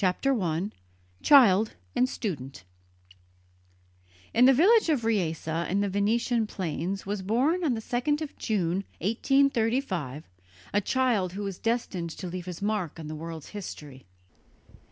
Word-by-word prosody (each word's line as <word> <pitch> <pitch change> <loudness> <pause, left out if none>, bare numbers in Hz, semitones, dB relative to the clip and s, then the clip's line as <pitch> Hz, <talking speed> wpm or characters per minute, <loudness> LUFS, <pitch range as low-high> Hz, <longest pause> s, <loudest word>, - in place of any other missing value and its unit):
THE 190 - +4
POPE 180 +8 -3
OF 275 - +4
PEACE 175 +2 -1
I 90 - -34
CHILD 225 -7 +6 0.2
AND 255 - +3
STUDENT 140 - -5 1.7
In 240 +3 +6
the 265 - +8
village 390 - +5
of 270 -8 +1
Riese 180 -9 0
in 170 +5 0
the 205 - 0
Venetian 220 +3 +1
plains 185 +1 -3
was 200 0 -3
born 260 - +1
on 275 -7 +1
the 220 - -4
2nd 250 +6 0
of 310 -3 -6
June, 185 -6 -1 0.2
1835, 225 - 0 0.5
a 205 - +3
child 220 -6 +1
who 205 +2 -4
was 195 -3 -5
destined 225 -7 -1
to 175 - -8
leave 180 0 -6
his 180 +1 -6
mark 205 -7 -2
on 160 - -7
the 155 - -5
world's 160 0 -7
history. 150 - -9
200 Hz, 155 wpm, -27 LUFS, 170-240 Hz, 1.7 s, the